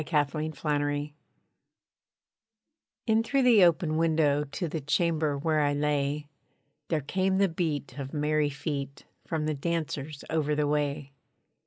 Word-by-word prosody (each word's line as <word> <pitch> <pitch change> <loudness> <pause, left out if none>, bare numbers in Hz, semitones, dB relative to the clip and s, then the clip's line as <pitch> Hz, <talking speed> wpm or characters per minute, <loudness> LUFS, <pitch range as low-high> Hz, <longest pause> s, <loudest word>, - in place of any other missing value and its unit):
A - - -3
STRAIN 155 0 0
OF - - -17
MUSIC 145 0 0 1.9
In 220 -1 +3
through 270 +4 +1
the 230 -6 +6
open 165 -2 +3
window 155 -3 +2
To 150 +5 -4
the 160 0 -4
chamber 155 0 +1
where 155 +1 +1
I 145 -1 +2
lay, 145 0 0 0.6
There 160 -3 0
came 190 +6 0
the 195 0 +4
beat 155 -4 -3
of 135 -1 -5
merry 150 -1 +1
feet, 140 -1 -5 0.2
From 160 -2 -1
the 155 - 0
dancers 150 -2 -3
over 150 -2 0
the 150 0 +1
way. 145 -1 -1
150 Hz, 145 wpm, -28 LUFS, 145-165 Hz, 1.9 s, the